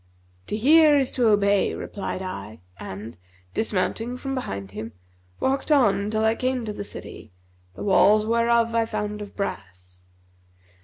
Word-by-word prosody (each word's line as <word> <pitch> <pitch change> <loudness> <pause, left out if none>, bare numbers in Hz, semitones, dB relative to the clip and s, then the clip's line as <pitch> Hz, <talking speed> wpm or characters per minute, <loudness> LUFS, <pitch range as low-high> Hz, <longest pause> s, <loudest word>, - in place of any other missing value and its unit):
'To 210 - -2
hear 300 +5 +6
is 270 -2 +1
to 245 -3 +2
obey,' 205 -2 +3
replied 190 -1 -5
I 115 - -7 0.2
and, 100 0 -8 0.3
dismounting 225 +4 -1
from 270 +1 -4
behind 100 - -5
him, 110 +2 -7 0.5
walked 270 +3 -1
on 205 -8 +3
till 220 0 0
I 220 - +4
came 255 0 -2
to 210 - -4
the 205 - -5
city, 110 - -8 0.4
the - - -7
walls 210 +2 +4
whereof 230 0 +2
I 230 -1 +1
found 210 -1 -4
of 205 - -9
brass. 90 - -7
210 Hz, 150 wpm, -24 LUFS, 185-235 Hz, 0.5 s, hear